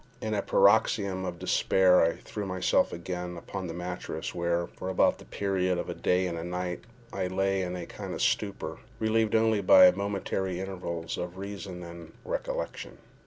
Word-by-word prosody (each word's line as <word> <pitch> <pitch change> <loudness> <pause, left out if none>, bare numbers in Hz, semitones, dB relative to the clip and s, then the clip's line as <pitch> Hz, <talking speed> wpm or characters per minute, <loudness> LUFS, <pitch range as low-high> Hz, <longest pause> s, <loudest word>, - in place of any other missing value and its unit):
In 110 0 -3
a 100 - +1
paroxysm 100 -2 +3
of 90 -1 -4
despair 90 0 +4
I 85 - +3
threw 105 - -7
myself 95 -1 +2
again 90 0 -5
upon 90 +2 -6
the 85 - -5
mattress, 90 +1 -5
where, 85 0 0
for 95 - -7
about 95 - +3
the - - -13
period 95 -2 0
of - - -4
a - - -2
day 90 +1 +1
and 85 -1 -4
night, 90 +1 -3 0.3
I 95 -1 -1
lay 95 +1 0
in 90 -1 -3
a 90 -2 -5
kind - - -7
of - - -4
stupor, - - -1 0.2
relieved 110 0 +1
only 110 -2 +3
by 275 - +8
momentary 95 - -2
intervals 90 -3 -4
of 90 +1 -5
reason 95 -2 -6
and 85 -1 -10
recollection. - - -4
95 Hz, 170 wpm, -28 LUFS, 90-100 Hz, 0.3 s, by